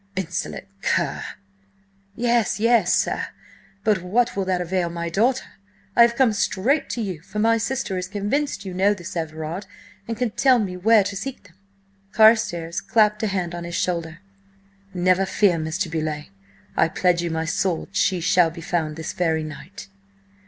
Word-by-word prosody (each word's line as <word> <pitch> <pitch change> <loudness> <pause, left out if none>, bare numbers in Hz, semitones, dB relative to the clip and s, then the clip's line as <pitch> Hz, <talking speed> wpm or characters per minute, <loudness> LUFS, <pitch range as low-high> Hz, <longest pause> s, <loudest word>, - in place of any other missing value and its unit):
"— - - -37
insolent 190 -3 -4 0.2
cur!" - - 0 0.9
"Yes, 235 -3 +1
yes, 230 -5 +4
sir! - - 0 0.6
But 210 -4 +2
what 225 +7 +1
will 195 -1 -1
that 185 -1 0
avail 180 0 -1
my 170 0 -4
daughter? 240 +9 +1 0.5
I - - +6
have 235 0 +6
come 250 -3 +3
straight 210 +7 0
to 240 - -3
you, 185 -7 -5
for 195 - -9
my 225 +1 +3
sister 220 -5 -2
is 180 - -4
convinced 210 +8 -2
you 190 - -5
know 195 +3 +3
this 175 -2 -8
Everard, 160 +3 -4 0.4
and 230 -1 -3
can 245 -2 -1
tell 260 +3 +4
me 195 -5 -2
where 215 +3 +4
to 200 +1 -4
seek 260 +7 -6
them!" 190 -4 -20 0.6
Carstares 200 -7 +3
clapped 210 -2 +2
a 220 - +1
hand 185 -3 -2
on 175 0 -5
his 170 0 -5
shoulder. 170 -1 -2 0.7
"Never 185 +1 +2
fear, 195 -2 +2
Mr. 160 +4 -2
Beauleigh! 155 -2 -3 0.5
I - - +4
pledge 175 +1 +1
you 170 - -2
my 160 0 -2 0.2
word 180 -3 -2
she 190 -2 +1
shall 180 0 +4
be 165 +1 -10
found 160 -2 -2
this 160 0 -5
very 160 -3 0
night!" 155 +7 -9
185 Hz, 175 wpm, -23 LUFS, 170-215 Hz, 0.9 s, I